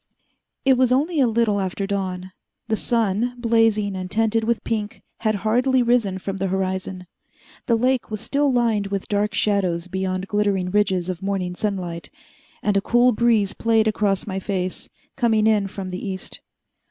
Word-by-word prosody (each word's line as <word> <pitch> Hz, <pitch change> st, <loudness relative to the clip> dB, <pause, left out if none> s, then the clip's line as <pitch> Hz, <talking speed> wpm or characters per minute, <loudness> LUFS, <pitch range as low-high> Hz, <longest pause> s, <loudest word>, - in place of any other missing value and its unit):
It 265 Hz, -2 st, +4 dB
was 255 Hz, -1 st, +3 dB
only 300 Hz, +5 st, +1 dB
a 260 Hz, -, +5 dB
little 225 Hz, -3 st, +1 dB
after 190 Hz, +1 st, -2 dB
dawn. 190 Hz, -2 st, -3 dB, 0.4 s
The 220 Hz, -, +2 dB
sun, 230 Hz, +1 st, 0 dB
blazing 225 Hz, -4 st, +2 dB
and 185 Hz, -1 st, -5 dB
tinted 225 Hz, +2 st, +1 dB
with 235 Hz, +1 st, 0 dB
pink, 215 Hz, -2 st, -3 dB, 0.2 s
had 215 Hz, -1 st, +1 dB
hardly 250 Hz, +3 st, +3 dB
risen 235 Hz, -6 st, +2 dB
from 195 Hz, +1 st, -5 dB
the 195 Hz, +1 st, -1 dB
horizon. 190 Hz, -1 st, -3 dB, 0.6 s
The 235 Hz, -, +4 dB
lake 255 Hz, +2 st, +1 dB
was 215 Hz, -1 st, -4 dB
still 280 Hz, +5 st, +1 dB
lined 230 Hz, -5 st, +1 dB
with 195 Hz, -1 st, -3 dB
dark 205 Hz, -1 st, 0 dB
shadows 185 Hz, -4 st, +1 dB
behind 185 Hz, 0 st, -2 dB
glittering 200 Hz, -3 st, 0 dB
ridges 190 Hz, -3 st, +1 dB
of 185 Hz, -1 st, -4 dB
morning 190 Hz, -2 st, -2 dB
sunlight, 180 Hz, -6 st, -3 dB, 0.5 s
and 205 Hz, -1 st, +1 dB
a 200 Hz, -, +3 dB
cool 240 Hz, +4 st, +4 dB
breeze 220 Hz, -4 st, +2 dB
played 225 Hz, -1 st, +2 dB
across 205 Hz, -2 st, 0 dB
my 190 Hz, -2 st, -3 dB
face, 185 Hz, -2 st, -3 dB, 0.3 s
coming 225 Hz, -4 st, +2 dB
in 210 Hz, -2 st, +3 dB
from 190 Hz, -1 st, -6 dB
the 180 Hz, -, -5 dB
east. 190 Hz, -2 st, -6 dB
205 Hz, 165 wpm, -22 LUFS, 190-230 Hz, 0.6 s, a